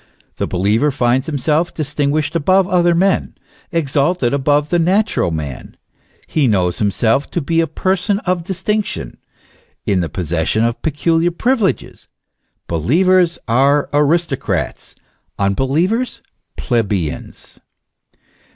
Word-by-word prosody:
The - - -1
believer 105 +10 +1
finds 130 0 +1
himself 155 +3 0
distinguished 145 +1 -1
above 185 +4 +3
other 175 -2 +3
men, 190 +3 +1 0.4
exalted 145 -3 0
above 145 +2 +1
the 175 - +2
natural 190 - +1
man; 75 -5 -6 0.5
he 150 -4 +1
knows 90 -5 +1
himself 110 +6 +1
to - - -2
be 165 +2 +1
a 165 - 0
person 190 +5 0
of 180 -2 -1
distinction, 195 +2 -3 0.7
in 95 - +1
the 85 -3 -2
possession 85 +4 -1
of 115 0 -1
peculiar 165 +3 +1
pri 230 +9 +1
vileges; 215 -7 -2 0.6
believers 170 - +2
are 140 +5 +2
aristocrats, 145 - -1 0.4
unbelievers 150 - 0 0.3
plebeians. 100 - -3
145 Hz, 110 wpm, -17 LUFS, 115-175 Hz, 0.7 s, above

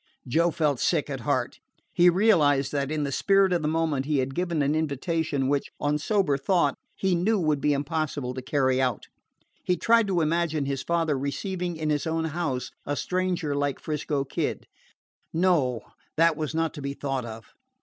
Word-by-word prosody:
Joe 165 +7 +3
felt 150 -5 0
sick - - +1
at - - -3
heart. - - -1 0.3
He 175 +1 +6
realized 155 -8 +3
that 140 -2 -1
in 155 -1 -1
the 140 - -2
spirit 195 +5 +3
of 175 - +1
the 150 - -1
moment 155 -4 0
he 150 -2 +1
had 135 0 -1
given 170 -2 0
an 140 +2 +1
invitation 155 -1 -1
which, 140 0 0
on 150 +1 0
sober 155 -5 +1
thought, 145 -1 +2 0.2
he 190 -1 0
knew 200 +5 +2
would 155 -4 +1
be 150 - +2
impossible 145 -2 -2
to 130 - -5
carry 130 -1 +1
out. 125 -5 -1 0.6
He 180 - +1
tried 230 -2 +3
to 180 -3 +1
imagine 160 -2 0
his 135 -1 -2
father 165 -1 0
receiving 175 +6 -3
in 155 -1 -1
his 150 +1 -1
own 160 0 -1
house 135 -7 -2
a 145 - -2
stranger 180 -3 -1
like 140 -1 -1
'Frisco 150 -2 -2
Kid 135 - -3 0.7
no, 160 -9 +2 0.4
that 165 0 +4
was 155 0 -3
not 165 0 0
to 150 - -8
be 140 0 -4
thought 135 -3 -2
of. 115 -1 -9
150 Hz, 185 wpm, -26 LUFS, 140-170 Hz, 0.7 s, He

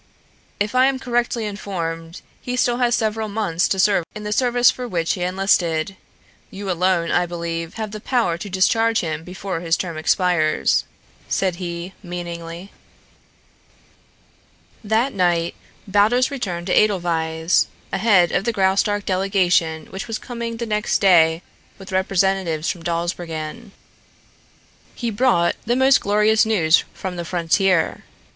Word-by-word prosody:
"If 205 +2 -1
I 255 +1 +5
am 270 -1 0
correctly 240 -3 -1
informed 170 -5 -5 0.2
he 250 - -3
still 245 -1 +1
has 245 -1 +2
several 220 0 -1
months 200 -5 0
to 195 - -1
serve 195 -2 +3
in 215 - -7
the 210 - -4
service 245 0 +4
for 250 -1 -6
which 170 -6 -1
he 180 - -5
enlisted. 180 -2 +1 0.5
You 195 -1 -5
alone, 180 -1 +1
I 175 0 +2
believe, 165 -1 -5
have 220 -2 -4
the 215 - -6
power 230 -10 +1
to 185 +4 -7
discharge 225 +4 +2
him 160 -2 -4
before 185 0 -5
his 165 -1 0
term 170 -3 -4
expires," 160 -1 +2 0.4
said 185 -3 0
he 175 0 -5
meaningly. 175 0 -7 2.1
That 225 +6 +1
night 175 -3 +1 0.3
Baldos 215 +7 +3
returned 180 -11 -4
to 185 - 0
Edelweiss, 165 -4 +2 0.3
ahead 190 -4 +4
of - - 0
the 235 - 0
Graustark 200 0 +1
delegation 185 -4 +1
which 190 +4 -6
was 225 -1 -3
coming 235 -2 -6
the 235 - -3
next 210 -1 0
day 165 -4 +4 0.3
with 190 0 -11
representatives 190 -3 0
from 175 - -9
Dawsbergen. 170 +4 -4 1.2
He 235 -2 -3
brought 205 -6 +2
the 240 - +2
most 265 +1 +4
glorious 210 +2 +3
news 180 -7 +3
from 185 -1 -6
the 175 - -3
frontier. 175 +1 +1
190 Hz, 140 wpm, -21 LUFS, 170-215 Hz, 2.1 s, I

